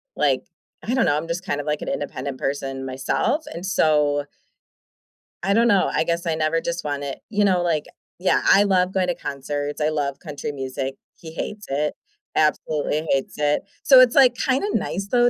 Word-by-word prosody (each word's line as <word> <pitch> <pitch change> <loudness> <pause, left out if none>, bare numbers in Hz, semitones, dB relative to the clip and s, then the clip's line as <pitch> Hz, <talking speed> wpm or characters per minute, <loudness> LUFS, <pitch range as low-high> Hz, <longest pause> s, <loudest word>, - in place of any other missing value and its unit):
like - - +1 0.4
I 245 - 0
don't 260 - +3
know, 145 - +3
I'm 155 +2 -3
just 175 +3 -3
kind 145 -6 -1
of, - - -11
like, 150 0 -1
an - - -6
independent 140 -2 -4
person 135 -1 -3
myself, 135 - -1
and 170 +3 -6
so 150 -5 +2 1.2
I 200 +2 +2
don't 235 +2 +4
know, 200 -4 +3
I - - +2
guess 170 +1 -1
I 165 -1 0
never 160 +1 +1
just 170 0 -3
want 145 -1 -3
it, 140 -1 -5
you 210 -1 +2
know, 185 -3 +3
like 160 -4 0 0.3
Yeah, 185 - +2
I 200 - +7
love 185 -2 +2
going 185 -1 +1
to 175 - 0
concerts, 145 +2 -4
I 150 - +2
love 145 -3 -2
country 150 -3 -5
music, 135 -1 -4 0.2
he 160 -1 -11
hates 205 +5 -5
it, 145 +2 0 0.4
absolutely 155 0 +1
hates 135 -1 0
it, 150 0 +1 0.2
so 265 -2 +8
it's, 250 -2 +6
like, 260 -4 +7
kinda 265 +9 0
nice 200 -2 -2
though, 245 -1 +5
155 Hz, 195 wpm, -23 LUFS, 145-190 Hz, 1.2 s, so